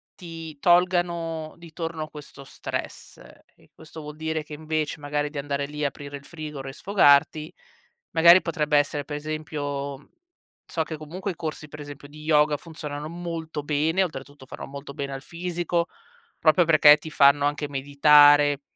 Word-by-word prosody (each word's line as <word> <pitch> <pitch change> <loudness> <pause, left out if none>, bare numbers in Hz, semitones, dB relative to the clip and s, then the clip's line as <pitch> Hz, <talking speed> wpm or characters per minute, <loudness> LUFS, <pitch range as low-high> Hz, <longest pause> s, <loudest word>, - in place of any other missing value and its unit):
ti 165 -4 -9
tolgano 175 -2 +1
di 170 -1 -13
torno 160 -2 -5
questo 145 -2 -12
stress, 135 - -7 0.4
e - - -25
questo 160 0 -12
vuol 150 0 -9
dire 160 0 -2
che 150 - -19
invece 155 0 -3
magari 145 0 -2
di 145 - -9
andare 140 0 -2
lì 150 0 -4
aprire 140 0 -5
il 140 - -16
frigo 150 -4 -7
e 135 - -7
sfogarti, 155 -4 +3 0.6
magari 170 +3 +7
potrebbe 150 -3 0
essere 145 0 0
per 145 - -5
esempio, 145 -2 -5 0.6
so 160 - -2
che 160 0 -7
comunque 175 +6 -5
i - - -9
corsi 155 -2 -6
per 150 - -10
esempio 145 -1 -10
di 150 +1 -12
yoga 150 -1 +3
funzionano 150 -2 -7
molto 165 -2 -5
bene, 155 +5 +1
oltretutto 145 -4 -7
fanno - - -9
molto 140 +1 -9
bene 140 -1 -5
al 135 - -6
fisico 175 +1 -2 0.5
proprio 165 +3 +4
perché 150 -2 +7
ti 155 +1 -9
fanno 140 0 +5
anche 145 0 -1
meditare, 145 +1 +5
150 Hz, 160 wpm, -25 LUFS, 145-160 Hz, 0.6 s, magari